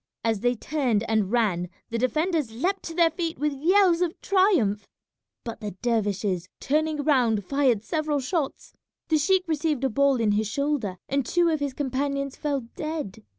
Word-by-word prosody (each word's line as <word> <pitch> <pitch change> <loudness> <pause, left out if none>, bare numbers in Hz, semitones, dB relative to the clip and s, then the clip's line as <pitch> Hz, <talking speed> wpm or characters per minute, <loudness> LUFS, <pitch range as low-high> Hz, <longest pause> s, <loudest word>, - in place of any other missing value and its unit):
As 225 -2 +1
they 245 +3 +1
turned 245 -5 0
and 215 -3 +1
ran 195 -7 +1 0.2
the 230 - -1
defenders 305 +3 0
leapt 365 - -1
to 330 - -6
their 335 -1 +4
feet 330 0 -3
with 300 0 0
yells 350 +4 +3
of 345 -2 -1
triumph; 335 - +2 0.6
but 230 -1 -6
the 205 -4 -5
dervishes, 205 -6 0
turning 305 +1 0
round, 240 -9 +2
fired 260 -5 +2
several 305 +3 -1
shots. 280 +1 -3 0.4
The 310 -1 +3
sheik 370 +4 +2
received 305 -3 0
a 265 - +1
ball 280 +3 +3
in 225 -4 +1
his 210 +1 +1
shoulder 270 -6 -1
and 275 0 0
two 345 +7 +2
of 315 -2 0
his 285 -2 -3
companions 275 0 -2
fell 285 -3 -2
dead. 305 -10 -5
275 Hz, 170 wpm, -25 LUFS, 225-315 Hz, 0.6 s, their